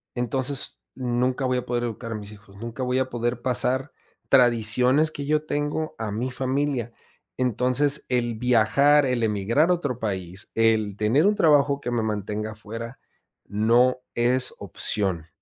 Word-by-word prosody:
entonces 130 - -2 0.2
nunca 125 +1 -1
voy 130 0 +1
a 125 - -3
poder 120 0 -1
educar 115 0 -5
a - - -4
mis 105 -1 -8
hijos, 105 -1 -16
nunca 115 +4 -7
voy 125 +1 0
a 130 0 -1
poder 120 0 -2
pasar 130 +2 0 0.4
tradiciones 125 +4 +4
que 145 -2 -6
yo 150 +1 0
tengo 150 +1 -2
a 110 -1 -3
mi 120 +5 -3
familia. 130 -2 -2 0.4
Entonces, 130 +4 +2
el 120 -2 0
viajar, 125 +5 +4
el 125 -2 0
emigrar 110 - +1
a - - +5
otro 145 -9 -3
país, 95 -3 -4
el 110 -3 +2
tener 120 - +3
un 210 - +3
trabajo 145 -5 +3
que 120 - -4
me 120 -1 0
mantenga 105 0 -3
fuera 115 +4 -8 0.5
no 120 +5 +3 0.2
es 125 +2 +1
opción. 95 -6 -3
125 Hz, 155 wpm, -24 LUFS, 110-135 Hz, 0.5 s, a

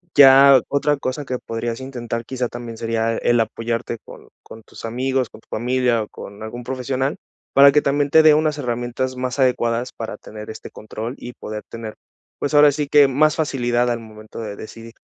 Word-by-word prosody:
ya 135 -1 +8
otra 145 +1 +1
cosa 140 +1 -4
que 125 -1 -3
podrías 115 0 -4
intentar, 120 -3 -5
quizá, 125 0 -3
también 120 -1 -8
sería 115 0 -1
el 120 0 +2
apoyarte 115 +1 -2
con - - -13 0.2
con 110 - -12
tus 115 - -11
amigos, 130 +1 -1
con - - -14
tu - - -34
familia, 125 0 0
o - - -10
con 100 +1 -11
algún 120 +3 -7
profesional, 130 +2 -2 0.4
para 140 0 +8
que 150 +1 +3
también 140 0 0
te 160 - +7
dé 155 -1 +6
unas 155 -1 0
herramientas 120 0 -3
más 125 +1 -4
adecuadas 125 -1 +1
para 110 -2 -6
tener 105 +1 -9
este 110 - -10
control, 110 +3 -7
y 125 - -9
poder 105 -2 -7
tener, 115 -2 -8 0.4
pues, 145 - -3
ahora 145 0 +7
sí 145 +1 -3
que 145 0 +6
más 150 +3 +2
facilidad 125 -5 0
al 120 -1 -1
momento 110 -1 -11
de 105 -3 -5
decidir. 115 +2 -11
125 Hz, 190 wpm, -21 LUFS, 115-135 Hz, 0.4 s, ya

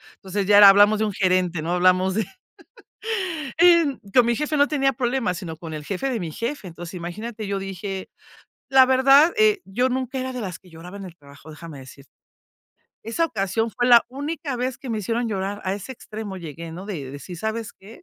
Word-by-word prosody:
Entonces, 195 +1 -4
ya 205 0 +6
era 205 -1 +10
hablamos 205 +2 +5
de 220 - +1
un 210 - -3
gerente, 185 -3 +1
¿no?, 165 +3 -2
hablamos 185 +1 +3
de 220 - 0 1.3
en 335 -6 +5
con 250 - +6
mi 235 - +2
jefe 300 +3 -1
no 285 0 +4
tenía 275 -3 +1
problemas, 245 -7 -1
sino 170 -4 -7
con 160 0 -8
el 150 -1 -7
jefe 200 - -3
de 250 -3 -1
mi 170 -5 -5
jefe. 235 - -4
Entonces 175 0 -9
imagínate, 210 +6 -6
yo 200 0 -2
dije 195 0 -6 0.6
la 265 -1 +7
verdad, 270 +5 +5
eh, 425 -2 +3
yo 240 +7 0
nunca 260 +1 -3
era 260 0 -4
de 250 - -5
las 185 -4 -6
que 185 - -20
lloraba 175 +4 -11
en 195 - -8
el 175 -2 -11
trabajo, 140 -1 -16
déjame 155 -1 -10
decirte. 135 +1 -15 0.9
Esa 230 +10 0
ocasión 225 - -2
fue 245 +2 -1
la 240 -1 +7
única 285 +1 -4
vez 250 +1 -2
que 260 - -7
me 220 - -1
hicieron 230 +3 -2
llorar, 200 0 -3
a 190 +1 -1
ese 200 +5 -7
extremo 215 -4 -8
llegué, 165 -1 -8
¿no?, 180 +3 -8
de 150 -11 -6
decir: 145 +5 -9
"¿Sabes 220 +4 -4
qué? 210 +4 -16
205 Hz, 205 wpm, -23 LUFS, 180-255 Hz, 1.3 s, era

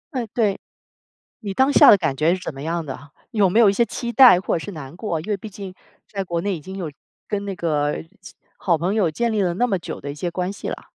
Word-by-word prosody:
嗯， 245 -3 -2
对。 210 -5 +1 0.8
你 200 -2 -5
当 265 +5 +3
下 - - +8
的 205 - +7
感 155 -7 -1
觉 155 +5 +2
是 185 - -4
怎 - - -5
么 135 - -9
样 165 +2 -2
的？ 140 +1 -9 0.2
有 205 -4 +3
没 220 - +2
有 220 - +7
一 195 - +1
些 235 - +3
期 235 0 -5
待 250 -8 +8
或 185 - -1
者 160 - -6
是 205 - -6
难 150 -4 -9
过， 180 -4 -3
因 170 +8 -8
为 205 - +1
毕 215 +3 -9
竟 190 -1 -9 0.3
在 195 -2 -4
国 170 -2 -3
内 200 -1 -1
已 155 - -9
经 190 +5 -8
有 175 -5 -4 0.4
跟 205 -1 -2
那 195 - -3
个 150 -3 -1 0.2
其 185 - -12 0.2
好 170 -3 +1
朋 180 +6 -1
友 185 -7 +2
建 235 +7 -1
立 210 -2 +1
了 175 -2 +1
那 245 +5 +1
么 195 - 0
久 170 - -7
的 140 - -7
一 - - -9
些 175 +3 -3
关 180 +2 -2
系 200 - -6
了。 - - -7
185 Hz, 295 characters per minute, -22 LUFS, 165-210 Hz, 0.8 s, 下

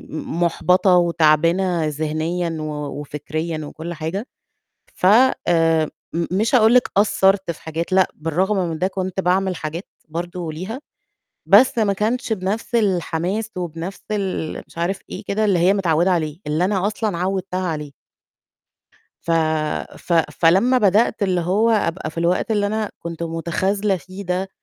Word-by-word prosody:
م 160 +2 -5
مُحبطة 180 +2 +3
وتعبانة 170 +1 +3
ذهنيًا 160 +3 -2
و 150 -2 -5
وفكريًا 155 +3 -4
وكل 165 +3 -7
حاجة. 165 +8 -4 0.7
ف 180 - -1
آمم 170 - +4 0.3
م 170 0 0
مش 215 +7 +1
هاقول 225 -1 +6
لِك 250 - +4
قصّرت 195 -2 +3
في 165 - -7
حاجات 165 +3 -4
لأ، 185 -1 +4
بالرغم 180 +7 0
من 160 - -4
ده 185 - +1
كنت 190 -1 -3
باعمل 185 0 +1
حاجات 160 +5 -5 0.2
برضه 170 0 -5
ليها، 190 - -6 0.7
بس 245 +6 +6
ما 210 -3 +2
كانش 225 +4 -1
بنِفْس 210 +4 -3
الحماس 195 0 0
وبنَفْس 175 +1 -5
ال 195 -6 -3
مش - - -18
عارف 180 +3 -1
إيه - - -7
كده 215 +2 0
اللي 195 -4 +2
هي 180 +3 +4
متعوّدة 175 -2 +2
عليه 155 -4 -1
اللي 155 +4 +1
أنا 195 0 +1
أصلًا 210 -3 -2
عوّدتها 185 0 -2
عليه 150 -3 -4 1.4
ف - - -2 0.7
ف - - -5 0.2
فلمّا 195 +10 +3
بدأت 215 +1 +2
اللي 185 -3 +1
هو 200 +7 +2
أبقى 185 -6 0
في 160 - -9
الوقت 170 +6 +1
اللي 205 -2 +2
أنا 215 0 -2
كنت 170 0 -6
مُتخاذلة 190 +5 -1
فيه 185 +3 -9
ده 180 +1 -2
180 Hz, 150 wpm, -21 LUFS, 165-200 Hz, 1.4 s, هاقول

